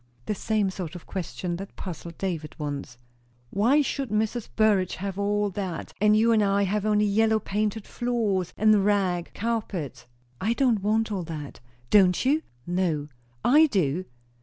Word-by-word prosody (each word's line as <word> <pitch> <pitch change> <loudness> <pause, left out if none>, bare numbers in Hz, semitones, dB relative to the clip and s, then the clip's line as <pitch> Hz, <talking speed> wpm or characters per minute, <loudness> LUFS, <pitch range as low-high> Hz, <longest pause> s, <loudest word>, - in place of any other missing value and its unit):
"The - - -1
same 210 -1 0
sort 180 -3 -6
of 175 - -9
question 180 -1 -4
that 195 +2 -9
puzzled 170 -2 -7
David 165 -6 -3
once." 145 -5 -5 0.5
"Why 250 +9 +3
should 275 -2 -3
Mrs. 220 +2 -1
Burrage 205 -4 +3
have 195 +1 -5
all 205 0 +1
that, 185 -3 -5
and 210 0 +5
you 230 +2 +4
and 220 -2 +4
I 200 0 +2
have 205 +2 0
only 210 0 +3
yellow 220 +2 +3
painted 210 0 -2
floors 215 -7 -1
and 215 -1 +4
rag 190 -4 +1
carpets?" 205 - -3 0.4
"I 220 +4 +2
don't 240 -5 +2
want 220 +2 +1
'all 195 -3 -1
that.'" 155 -4 -7 0.3
"Don't 185 +1 +5
you?" 295 +4 +3 0.2
"No." 170 -5 -1 0.4
"I 305 +5 +6
do." 185 - 0
200 Hz, 160 wpm, -26 LUFS, 180-220 Hz, 0.5 s, I